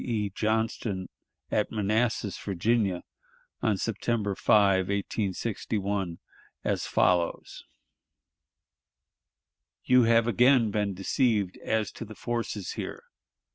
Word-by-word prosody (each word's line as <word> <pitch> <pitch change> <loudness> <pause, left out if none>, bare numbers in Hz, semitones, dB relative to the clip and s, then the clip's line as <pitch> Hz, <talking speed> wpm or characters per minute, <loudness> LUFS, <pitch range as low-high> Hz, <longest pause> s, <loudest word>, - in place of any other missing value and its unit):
E. 105 -5 -1
Johnston 110 -2 -1 0.4
at 105 - +1
Manassas, 110 0 0
Virginia, 100 -1 0 0.6
on 110 -4 +1
September 110 0 -1
5, 95 -2 +3
1861, 100 -2 -2 0.5
as - - -1
follows: 90 -2 +1 2.2
"You 125 -1 +5
have 115 0 +4
again 120 0 +4
been 100 -2 -1
deceived 100 -1 +1
as 110 -1 -1
to - - -8
the 110 -1 -10
forces 115 -5 -3
here. - - -6
105 Hz, 95 wpm, -28 LUFS, 95-115 Hz, 2.2 s, You